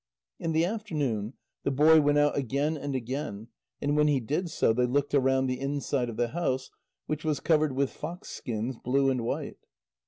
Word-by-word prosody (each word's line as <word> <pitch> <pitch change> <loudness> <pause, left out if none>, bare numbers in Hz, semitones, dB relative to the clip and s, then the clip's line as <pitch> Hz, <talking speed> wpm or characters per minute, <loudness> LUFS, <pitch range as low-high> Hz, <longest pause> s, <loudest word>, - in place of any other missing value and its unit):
In 165 -1 -2
the 160 +1 +3
afternoon, 150 - -2 0.3
the - - +1
boy 155 +3 +6
went 145 0 +3
out 145 0 +3
again 140 +4 0
and 145 -2 -4
again 125 -3 -4 0.3
and 145 +1 0
when 150 0 +4
he 145 -2 +3
did 150 +9 -2
so, 135 -7 +2
they 125 +2 +2
looked 140 +3 0
round 135 -1 +3
the 130 -1 -2
inside 135 -2 -1
of 115 - -7
the 120 -1 +1
house, 130 -4 -2 0.3
which 155 0 -3
was 155 -3 0
covered 155 -3 +2
with 135 0 0
fox 170 +4 -7
skins, 115 +2 -4
blue 135 +2 +2
and 125 -2 -1
white. 115 - -3
140 Hz, 190 wpm, -28 LUFS, 130-150 Hz, 0.3 s, boy